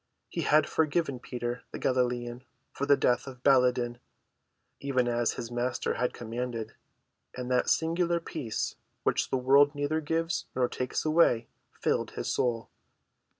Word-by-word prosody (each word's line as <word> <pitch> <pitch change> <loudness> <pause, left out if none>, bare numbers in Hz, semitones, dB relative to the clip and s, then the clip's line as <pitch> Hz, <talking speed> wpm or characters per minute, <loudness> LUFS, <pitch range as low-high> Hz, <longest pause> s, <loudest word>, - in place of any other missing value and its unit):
He - - -3
had 155 +1 +4
forgiven 155 -4 0
Peter, 120 0 -4
the - - -5
Galilean, 125 -1 -1 0.3
for 140 - -3
the 140 -1 +6
death 125 +2 +1
of 130 -2 -10
Baladan, 125 -3 +3 0.8
even 130 -3 0
as 120 -1 +1
his 115 - -6
Master 120 +1 -1
had 125 - 0
commanded, 115 -1 -5 0.6
and 125 0 -4
that 125 - +2
singular 170 +1 +2
peace 150 -9 -3 0.3
which - - +1
the 130 - +1
world 140 +3 +5
neither 145 +2 0
gives 165 +2 -1
nor 125 -1 +2
takes 125 +4 -3
away 155 -7 +3 0.3
filled - - 0
his - - -1
soul. 115 -2 -1
125 Hz, 145 wpm, -29 LUFS, 120-145 Hz, 0.8 s, the